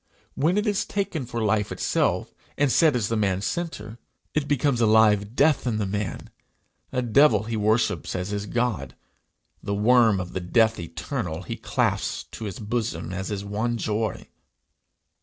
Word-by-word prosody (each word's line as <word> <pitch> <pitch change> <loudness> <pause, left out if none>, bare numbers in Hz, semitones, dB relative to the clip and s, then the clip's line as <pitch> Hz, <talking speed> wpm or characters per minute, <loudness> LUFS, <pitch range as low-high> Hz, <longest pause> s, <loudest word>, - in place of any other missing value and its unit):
When 165 +7 +1
it 210 - +1
is 210 0 +1
taken 195 - -3
for 115 -2 -3
life 105 -1 +1
itself, - - 0 0.2
and 145 -2 +2
set 155 -2 +4
as 115 -4 0
the 115 - -1
man's 100 -3 0
centre, 120 -10 -4 0.3
it 150 -2 0
becomes 140 -3 +1
a 115 - +4
live 105 0 +4
death 145 -2 +3
in 115 -3 0
the 105 - 0
man, 100 -1 -4 0.6
a 125 - -1
devil 135 +1 +4
he 115 +1 -4
worships 110 +2 +1
as 90 +1 -3
his 105 0 -3
god; 105 - -2 0.7
the 100 - -2
worm 110 -1 +4
of 90 -1 -6
the - - -2
death 110 +5 +2
eternal 85 - -4
he - - -5
clasps - - -1
to 110 - -7
his 100 -3 -5
bosom 105 -6 -3
as 95 +1 -4
his 100 -1 -4
one 110 +4 -1
joy! 110 0 -2
110 Hz, 170 wpm, -25 LUFS, 100-125 Hz, 0.7 s, set